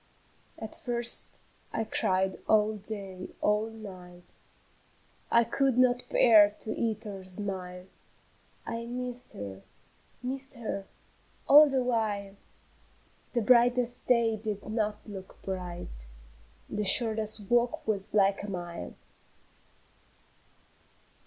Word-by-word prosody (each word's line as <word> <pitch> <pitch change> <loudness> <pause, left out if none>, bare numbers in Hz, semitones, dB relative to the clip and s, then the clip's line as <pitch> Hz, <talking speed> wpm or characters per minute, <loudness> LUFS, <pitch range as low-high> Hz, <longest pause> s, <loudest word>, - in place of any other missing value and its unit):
At 220 - -5
first 240 -1 -1 0.3
I 225 - -1
cried 190 -3 0
all 215 0 +3
day, 195 -3 -5
all 210 +1 +1
night; 185 -5 -11 0.9
I 235 - +5
could 260 +2 +1
not 250 -1 +3
bear 215 -4 +7
to 210 +1 -6
eat 225 -1 -2
or 195 -2 -7
smile, 185 -1 -5 0.8
I 230 0 -4
missed 250 0 -4
her, 100 -1 -7 0.6
missed 265 +1 -1
her, 215 -4 -4 0.6
all 295 +1 +9
the 265 -2 +1
while 210 -5 -1 1.0
The 240 - +1
brightest 245 +1 +3
day 230 -3 +3
did 210 -2 -5
not 215 -1 -1
look 195 -3 -10
bright, 175 - -6 0.6
The 210 - -3
shortest 215 0 +4
walk 240 +4 0
was 205 -1 -2
like 195 -1 +3
a 205 - -6
mile. 175 -2 -6
215 Hz, 105 wpm, -29 LUFS, 195-235 Hz, 1.0 s, all